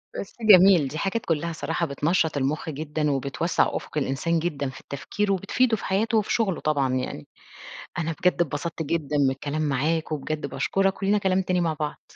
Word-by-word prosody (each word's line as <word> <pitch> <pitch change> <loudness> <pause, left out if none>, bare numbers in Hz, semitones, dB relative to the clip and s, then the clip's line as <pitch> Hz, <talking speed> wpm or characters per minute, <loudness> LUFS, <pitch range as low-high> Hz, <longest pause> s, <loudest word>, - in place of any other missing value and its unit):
بس 195 - -6
جميل، 190 -7 +7
دي 150 - -6
حاجات 195 +6 -2
كلّها 165 +1 -1
صراحة 165 +3 -2
بتنشّط 155 +2 0
المُخ 145 +4 -1
جدًا 150 0 -2
وبتوسّع 140 +5 0
أُفُق - - -5
الإنسان 150 +4 0
جدًا 145 -5 -2
في 130 - -11
التفكير، 200 +8 -3
وبتفيده 220 +5 +1
في - - -8
حياته 220 +4 +1
وفي 210 - 0
شُغله 205 -7 0
طبعًا 140 -4 +1
يعني. 125 - -3 0.7
أنا 165 0 -1
بجد 180 -1 +2
اتبسطت 160 +2 -3
جدًا 150 -2 -2
من 135 -2 +4
الكلام 145 +3 -3
معاك 155 +3 0
وبجد 150 0 -3
باشكُرك 195 +5 0
ولينا 205 +2 +3
كلام 190 -1 +1
تاني 180 -1 0
مع 165 -2 +1
بعض. 150 -1 -4
160 Hz, 180 wpm, -25 LUFS, 145-185 Hz, 0.7 s, جميل